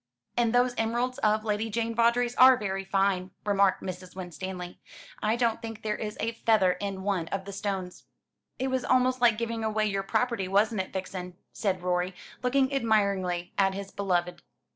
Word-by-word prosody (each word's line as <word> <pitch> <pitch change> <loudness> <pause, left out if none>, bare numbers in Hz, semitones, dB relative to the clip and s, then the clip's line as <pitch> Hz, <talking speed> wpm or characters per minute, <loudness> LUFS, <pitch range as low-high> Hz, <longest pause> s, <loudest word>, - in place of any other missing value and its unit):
"And 235 -2 +2
those 245 +1 +3
emeralds 240 +3 0
of 215 0 +2
Lady 215 +1 -1
Jane 230 +1 -1
Vawdrey's 235 +1 +2
are 255 0 +8
very 195 -3 -3
fine," 195 -1 +1 0.2
remarked 200 -2 +2
Mrs. 185 0 -7
Winstanley. 180 0 -6 0.4
"I 215 +1 +2
don't 235 -1 0
think 225 -2 -7
there 210 -1 -1
is 210 -1 -5
a 225 +2 0
feather 220 -5 +3
in 195 0 -4
one 190 -5 -1
of 190 +1 -4
the 200 - -7
stones." 195 -2 -4 0.5
"It 265 +1 -1
was 260 -1 0
almost 255 0 +2
like 235 -3 +5
giving 230 0 -3
away 215 0 +1
your 195 -2 0
property, 220 0 0
wasn't 205 +2 +2
it, 185 - -8
Vixen?" 185 -1 -5 0.2
said 190 -4 -1
Rorie, 180 0 0 0.3
looking 265 +2 +2
admiringly 200 -8 +1
at 195 -1 +3
his 195 0 -6
beloved. 180 -3 -1
210 Hz, 175 wpm, -28 LUFS, 190-230 Hz, 0.5 s, are